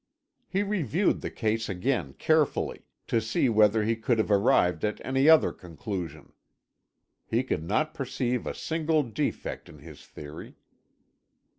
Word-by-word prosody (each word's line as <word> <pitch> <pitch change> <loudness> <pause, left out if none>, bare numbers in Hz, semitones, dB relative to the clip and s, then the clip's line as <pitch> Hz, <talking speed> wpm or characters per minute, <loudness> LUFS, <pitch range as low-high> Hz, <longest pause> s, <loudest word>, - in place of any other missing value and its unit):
He 195 +1 0
reviewed 190 - 0
the - - -4
case 110 0 -1
again 95 - -1
carefully, 155 - 0 0.2
to 115 - +1
see 110 +4 +1
whether 110 -1 +4
he 115 +2 +1
could 115 +1 0
have 110 -1 0
arrived 90 -4 +3
at 105 0 -1
any 135 +3 +3
other 160 -1 +6
conclusion. 90 +1 -7 0.9
He - - +1
could 80 - -2
not 155 - 0
perceive 125 -3 -2
a - - -3
single 160 -1 0
defect 115 -6 -4
in - - -13
his 75 0 -13
theory. 75 0 -10
115 Hz, 140 wpm, -27 LUFS, 100-145 Hz, 0.9 s, other